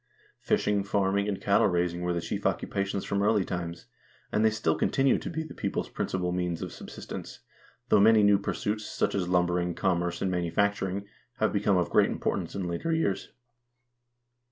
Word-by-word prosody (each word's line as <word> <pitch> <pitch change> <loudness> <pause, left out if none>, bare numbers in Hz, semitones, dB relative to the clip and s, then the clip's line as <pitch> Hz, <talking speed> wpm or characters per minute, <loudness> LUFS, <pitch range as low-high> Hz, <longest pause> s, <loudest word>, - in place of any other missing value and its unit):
Fishing, 100 -1 +1
farming, 100 0 +1
and 100 -2 -2
cattle 100 0 +3
raising 90 -1 0
were 90 0 0
the 85 - 0
chief - - -4
occupations 100 0 -2
from 100 0 0
early 105 -2 +3
times, 85 -1 -5 0.5
and 105 - +2
they 110 - +6
still 110 0 0
continue 135 -1 +2
to - - -5
be 160 -1 -3
the 155 - -9
people's - - -3
principal 90 -1 -2
means 90 -2 -2
of - - -6
subsistence, 60 - -8 0.5
though 105 - +5
many 110 +1 +6
new 100 -1 +5
pursuits, 105 +1 -2
such - - -1
as 90 -3 -1
lumbering, 90 -1 +1
commerce, 90 -2 0
and 95 - 0
manufacturing, 95 +2 0 0.3
have 110 - +1
become 100 -2 +2
of 90 -3 0
great - - +4
importance - - -2
in 95 -2 -2
later 85 - -2
years. 160 -12 0
100 Hz, 175 wpm, -28 LUFS, 90-105 Hz, 0.5 s, they